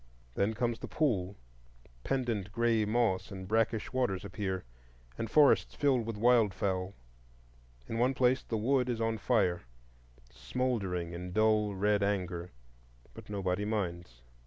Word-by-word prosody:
Then 105 Hz, -, 0 dB
comes 120 Hz, 0 st, -1 dB
the -, -, -6 dB
pool; 100 Hz, -, 0 dB, 0.7 s
pendent 115 Hz, -7 st, -1 dB
gray 115 Hz, -1 st, +2 dB
moss 110 Hz, -3 st, +1 dB
and 95 Hz, -2 st, -7 dB
brackish 110 Hz, +2 st, 0 dB
waters 100 Hz, -7 st, 0 dB
appear, 95 Hz, -2 st, -3 dB, 0.5 s
and 115 Hz, -, -4 dB
forests 145 Hz, +4 st, +4 dB
filled 130 Hz, -6 st, +1 dB
with 115 Hz, -, -3 dB
wildfowl. 100 Hz, -5 st, +2 dB, 0.9 s
In 115 Hz, -, -3 dB
one 130 Hz, +2 st, +2 dB
place 125 Hz, 0 st, +3 dB
the 115 Hz, -, -3 dB
wood 125 Hz, +3 st, +1 dB
is 120 Hz, -2 st, -1 dB
on 115 Hz, -1 st, -1 dB
fire, 100 Hz, -9 st, +1 dB, 0.7 s
smouldering 90 Hz, -, -2 dB
in 90 Hz, +1 st, -6 dB
dull 110 Hz, -1 st, +2 dB
red 105 Hz, +1 st, +2 dB
anger; 90 Hz, -3 st, -1 dB, 0.6 s
but -, -, -12 dB
nobody 100 Hz, -1 st, -1 dB
minds. 85 Hz, -, -3 dB
105 Hz, 135 wpm, -31 LUFS, 95-120 Hz, 0.9 s, forests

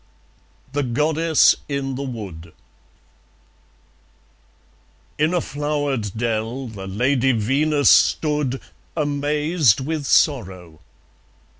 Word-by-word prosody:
The 145 Hz, -, 0 dB
Goddess 155 Hz, +5 st, +3 dB
in 140 Hz, -1 st, -2 dB
the 130 Hz, -, -5 dB
Wood 95 Hz, -, -7 dB, 2.7 s
In 155 Hz, +2 st, +2 dB
a 180 Hz, -, +1 dB
flowered 145 Hz, -8 st, -2 dB
dell 115 Hz, +3 st, -2 dB
the 100 Hz, -4 st, -8 dB
Lady 125 Hz, +6 st, +1 dB
Venus 140 Hz, +6 st, +2 dB
stood, 150 Hz, -4 st, +2 dB, 0.4 s
Amazed 150 Hz, -, +1 dB
with 145 Hz, +1 st, -3 dB
sorrow. 90 Hz, -, +1 dB
135 Hz, 85 wpm, -21 LUFS, 115-150 Hz, 2.7 s, Goddess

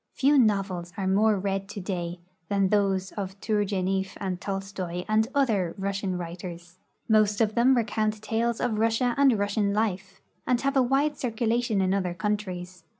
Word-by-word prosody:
Few 285 Hz, +2 st, +3 dB
novels 195 Hz, -6 st, +1 dB
are 195 Hz, -, -2 dB
more 205 Hz, +3 st, +3 dB
read 195 Hz, 0 st, -2 dB
today 180 Hz, -4 st, -4 dB, 0.3 s
than 195 Hz, -2 st, +2 dB
those 195 Hz, -2 st, +1 dB
of 195 Hz, -1 st, -6 dB
Tour 210 Hz, -1 st, +1 dB
geniefF 190 Hz, -1 st, -1 dB
and 185 Hz, -2 st, -4 dB
Tolstoi 195 Hz, -3 st, -4 dB
and 215 Hz, +1 st, +2 dB
other 215 Hz, -11 st, +1 dB
Russian 195 Hz, -1 st, -2 dB
Avriters. 175 Hz, 0 st, -8 dB, 0.3 s
Most 215 Hz, -2 st, +3 dB
of 220 Hz, -1 st, +2 dB
them 250 Hz, +3 st, +4 dB
recount 215 Hz, -2 st, 0 dB
tales 225 Hz, +2 st, -1 dB
of 225 Hz, -3 st, 0 dB
Russia 230 Hz, +2 st, +2 dB
and 275 Hz, -5 st, +4 dB
Russian 205 Hz, 0 st, 0 dB
life, 195 Hz, -3 st, -2 dB, 0.3 s
and 250 Hz, -1 st, +2 dB
have 275 Hz, 0 st, 0 dB
a 265 Hz, -, +5 dB
Avide 270 Hz, +4 st, +2 dB
circu 235 Hz, -3 st, -2 dB
lation 230 Hz, -3 st, +1 dB
in 185 Hz, 0 st, +1 dB
other 185 Hz, -3 st, -1 dB
countries. 185 Hz, -4 st, -3 dB
200 Hz, 165 wpm, -26 LUFS, 190-220 Hz, 0.3 s, a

